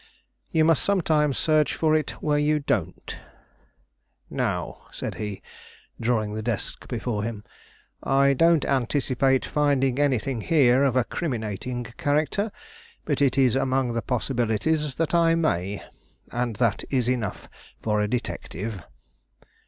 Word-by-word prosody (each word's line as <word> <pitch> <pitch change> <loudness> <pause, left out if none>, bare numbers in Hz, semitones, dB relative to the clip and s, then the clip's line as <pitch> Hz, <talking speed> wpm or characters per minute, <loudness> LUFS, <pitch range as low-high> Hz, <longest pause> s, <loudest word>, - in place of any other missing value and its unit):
You 160 -1 +3
must 165 -2 +3
sometimes 155 -7 +2
search 155 -2 +2
for 155 -1 +2
it 155 -2 +1
where 150 -1 +2
you 150 +1 +2
don't. 145 - -2 1.1
Now," - - -3
said - - -5
he, 105 -2 -5 0.6
drawing 110 -3 0
the 110 - -3
desk 110 -2 -3
before 115 -3 -2
him, 105 -1 -4 0.6
"I 140 +1 +3
don't 165 +2 +4
anticipate 135 0 +1
finding 140 -3 +1
anything 135 -3 +1
here 135 -3 +4
of 135 -3 +2
a 130 - +4
criminating 120 - -3
character; 145 - -1 0.5
but 145 -3 -1
it 135 -1 +3
is 130 -2 +4
among 130 -2 +1
the 115 - -1
possibilities 125 +5 0
that 165 0 -1
I 165 -1 +4
may; 100 - -1 0.5
and 120 -2 -2
that 115 -1 +1
is 125 -4 +1
enough 120 -6 -2 0.3
for 105 -1 0
a 105 - +1
detective." 110 -3 -4
130 Hz, 130 wpm, -25 LUFS, 115-150 Hz, 1.1 s, don't